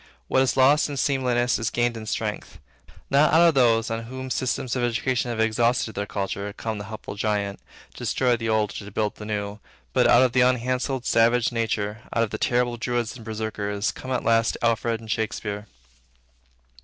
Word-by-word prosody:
What 130 - +3
is 135 0 +1
lost 140 +3 +5
in 145 - -5
seemliness 125 -3 +1
is 115 +1 -1
gained 120 0 0
in 110 -1 -7
strength. - - -4 0.5
Not 140 +3 +5
out 170 +2 +6
of - - +1
those, 115 -4 +3
on 115 0 -3
whom 130 +2 -7
systems 130 -1 -1
of 125 - -1
education 120 +1 0
have 115 -2 -3
exhausted 115 +1 +1
their 100 +1 -3
culture, 100 0 -3
comes 110 0 -4
the 100 - -6
helpful 110 -1 -7
giant 100 -1 -1 0.3
to - - -19
destroy 125 -2 +1
the 115 -1 -3
old 110 -2 +1
or - - -11
to - - -8
build 105 +1 -1
the 105 - -8
new, 105 -1 -3 0.3
but - - +4
out 120 - +6
of 125 -2 +2
unhandselled 125 +1 +1
savage 115 +1 +3
nature, 110 -2 -2
out 115 - +3
of - - -3
terrible 120 -1 +1
Druids 120 -1 -2
and 120 - -11
Berserkirs, 105 -2 -2
come 130 - -9
at 125 - 0
last 115 0 +2
Alfred 115 0 +1
and 110 -1 -7
Shakespeare. 105 -1 -3
115 Hz, 190 wpm, -24 LUFS, 110-125 Hz, 0.5 s, out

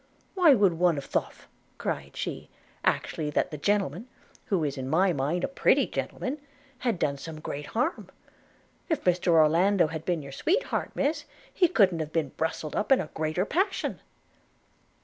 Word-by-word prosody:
'Why 345 -7 +6
one 195 -7 +2
would 175 -2 +4
have 140 - -5
thof,' - - -3 0.3
cried 70 0 -4
she, - - -4 0.3
'actually 155 -2 0
that 150 - 0
the 150 - -5
gentlemen, 200 - 0 0.4
who 185 -6 0
is 145 -2 -1
in 130 -1 -5
my 180 +4 +3
mind 155 +5 -1
a - - +2
pretty 275 - +3
gentleman, 280 +3 -4 0.4
had 235 -6 0
done 140 -3 0
some 160 +1 -7
great 145 -1 -6
harm. 285 +9 -1 0.8
If 320 - 0
Mr 180 0 +1
Orlando 170 +4 +5
had 160 0 -5
been 170 -4 -1
your 140 - -9
sweetheart, 380 - 0
Miss, 290 +3 0 0.3
he 360 - +4
couldn't 190 - +3
have 155 -1 -4
been 160 -4 0
brustled 160 +1 -3
up 210 - -1
in 270 - +7
a 155 - -4
greater 155 +4 -1
passion.' 380 - -1
175 Hz, 170 wpm, -27 LUFS, 155-215 Hz, 0.8 s, in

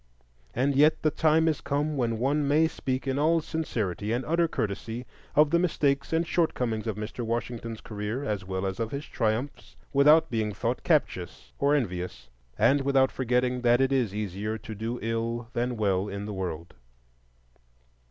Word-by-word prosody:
And 135 +3 +1
yet 150 +3 +4
the 155 - +3
time 160 +2 +3
is 155 -3 0
come 145 +2 -1
when 115 -4 0
one 140 +5 +1
may 155 +3 +4
speak 130 -4 -3
in 135 +1 0
all 165 +3 +3
sincerity 110 - -3
and 120 +3 -1
utter 170 +1 +2
courtesy 115 -1 -3 0.3
of 150 0 +5
the 170 - +4
mistakes 145 -5 +1
and 165 +1 +2
shortcomings 125 -10 0
of 110 - -1
Mr. 105 +3 -5
Washington's 115 -1 -3
career, 105 +5 -4
as 105 -7 -2
well 95 0 -3
as 95 +1 -3
of 115 -1 -1
his 140 +4 -5
triumphs, 115 +5 -2 0.2
without 150 +2 +5
being 110 -3 -1
thought - - -2
captious - - 0
or 140 +1 +3
envious, 90 - -3 0.3
and 140 +1 +4
without 135 -1 +3
forgetting 125 0 0
that 120 0 +4
it 135 0 +2
is 125 -7 +1
easier 105 +1 -3
to 110 - -8
do 110 +3 -4
ill 115 +1 -2
than 120 0 -1
well 100 -2 +1
in 100 +1 -5
the 105 - -5
world. 90 -3 -5
120 Hz, 170 wpm, -27 LUFS, 110-145 Hz, 0.3 s, of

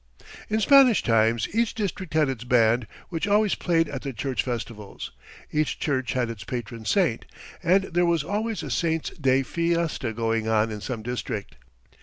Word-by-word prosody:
"In 215 +1 +1
Spanish 260 -1 +6
times 115 -1 +2
each 230 +1 +1
district 190 -6 -4
had 155 -2 +4
its 130 -3 -4
band, 120 -1 +3 0.2
which 170 +1 -2
always 210 0 +3
played 165 -2 +1
at 135 -3 -5
the 140 - -4
church 130 +2 -2
festivals. 115 -4 -6 0.4
Each 155 -1 0
church 130 -4 -1
had 125 -2 0
its 105 -4 -8
patron 120 0 -6
saint, 100 - +1 0.4
and 190 +4 +3
there 175 -2 +1
was 170 -3 +2
always 215 +5 -2
a - - -5
saint's 165 -2 0
day 135 -4 +2
fiesta 170 -5 -1
going 115 0 -1
on 110 0 +2
in 105 -1 -6
some 115 -2 -5
district. 115 - -4
135 Hz, 170 wpm, -25 LUFS, 115-170 Hz, 0.4 s, Spanish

